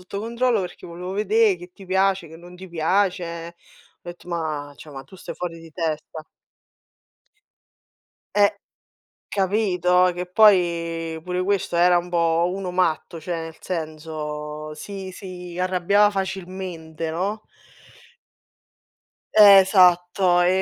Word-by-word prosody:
sotto 195 +2 -6
controllo 235 0 0
perché 180 -1 -7
volevo 180 +2 -7
vedé 210 0 +2
che 175 +1 -12
ti 195 - -15
piace, 190 -2 +1
che 160 - -12
non 175 +1 -13
ti 190 - -10
piace". 170 -1 -1 0.5
Ho - - -9
etto: 175 0 -10
"Ma 155 -4 -4
cioè 150 +5 -12
ma 135 -2 -9
tu 190 - -15
stai - - -8
fuori 165 -2 -6
di 165 -1 -13
testa". 155 -1 -4 2.1
Eh, 205 0 +4 0.7
capito? 185 -3 +2
Che 180 +1 -4
poi 170 -5 +2
pure 180 +1 -2
questo 190 -2 -1
era 175 +1 +5
un 175 - -5
po' 170 0 +1
uno 190 -1 -4
matto, 170 -2 -1
cioè 175 +2 -4
nel 165 0 -8
senso 155 -2 -5
si 195 +3 -7
si 180 -2 -9
arrabbiava 190 +3 +3
facilmente, 185 -4 -5
no? 195 +6 -3 1.9
Esatto, 185 -3 +6
ehm, 175 - +4
180 Hz, 125 wpm, -23 LUFS, 165-190 Hz, 2.1 s, Esatto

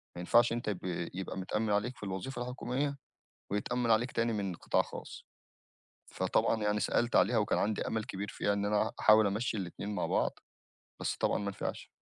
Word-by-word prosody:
ما - - -6
ينفعش 115 +7 +4
أنت 120 -1 -3
يبقى 90 -4 -2
يبقى 95 +1 -5
متأمّن 105 +4 -1
عليك 105 +5 0
في - - -12
الوظيفة 100 +7 -4
الحكومية، 125 +3 -2 0.5
ويتأمّن 120 +4 0
عليك 115 +3 +3
تاني 115 0 +1
من 100 -4 -2
قِطاع - - +2
خاص. - - -9 0.9
فطبعًا 110 -1 +1
يعني 105 0 +1
سألت 120 +3 +1
عليها 120 - +4
وكان 105 - +1
عَندي 105 0 0
أمل 110 -1 -1
كبير 100 +1 -5
فيها 100 - 0
إن 100 0 0
أنا 105 0 +1
أحاول 110 0 +7
أمشّي 110 +4 -1
الإتنين 100 +2 -4
مع 90 - 0
بعْض، - - +1 0.7
بس - - -1
طبعًا - - +1
ما 100 - -2
نفِعش. 100 - -5
105 Hz, 180 wpm, -32 LUFS, 100-120 Hz, 0.9 s, أحاول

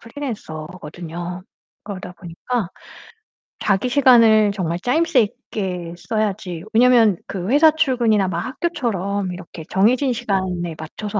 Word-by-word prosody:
프리랜서거든요. 175 - -7 0.4
그러다 195 -2 -7
보니까 180 +5 -4 0.9
자기 205 +4 +1
시간을 230 -6 +5
정말 175 -3 -2
짜임새 305 - +2
있게 185 -5 -4
써야지 195 -4 -3
왜냐면 230 -4 +5
그 185 0 -4
회사 305 +4 +6
출근이나 240 -10 +2
막 170 -2 -2
학교처럼 210 - -2
이렇게 175 -2 -9
정해진 250 +7 +2
시간에 190 -7 -2
맞춰서 205 +6 -5
205 Hz, 295 characters per minute, -20 LUFS, 180-245 Hz, 0.9 s, 회사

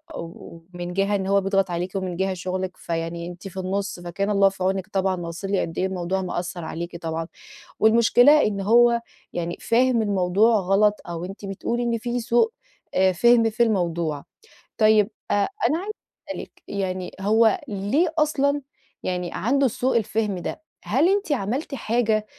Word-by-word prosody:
ومن 175 +1 -8
جهة 200 +2 +1
إن 190 -1 -2
هو 200 0 +3
بيضغط 195 -1 +1
عليكِ 175 +2 -2
ومن 185 -2 -2
جهة 190 +1 0
شغلِك 185 +1 -4
فيعني 165 0 -4
أنتِ 175 +2 -8
في 190 0 -11
النُص 195 0 -2
فكان 180 +4 -3
الله 200 -1 +4
في 190 -1 -6
عونِك 190 0 0
طبعًا، 190 -1 0
أنا 175 - -6
واصل 170 +4 -5
لي 195 - +2
قد 165 - -5
إيه 185 - +1
الموضوع 190 0 -2
مأثر 175 -1 -4
عليكِ 170 +2 -5
طبعًا، 165 0 -3 0.5
والمشكلة 235 +6 +6
إن 200 -2 -1
هو 235 +3 +5 0.3
يعني 170 0 -3
فاهم 240 0 +3
الموضوع 200 +2 +3
غلط 200 +3 +3
أو 170 0 -4
أنتِ 195 +2 -8
بتقولي 235 +5 -2
إن 235 -1 0
في 240 +2 -2
سوء 240 - +2 0.4
آآ 190 0 +4
فِهم 230 +5 +4
في 220 +2 +2
الموضوع، 170 -8 0 0.5
طيب 215 -1 +4 0.2
أ - - +3
أنا 330 - +1
عايزة 420 +3 -5 0.4
أسأل - - -4
لِك - - -14 0.2
يعني 185 -2 -3
هو 220 +2 +3
ليه 225 - 0
أصلًا 290 -2 +2 0.4
يعني 180 -1 -2
عنده 270 +5 +2
سوء 250 +2 0
الفهم 215 -2 -1
ده، 315 - -5 0.2
هل 305 +8 +2
أنتِ 400 -4 0
عملتِ 265 +4 -2
حاجة 220 -3 0
195 Hz, 170 wpm, -24 LUFS, 180-235 Hz, 0.5 s, والمشكلة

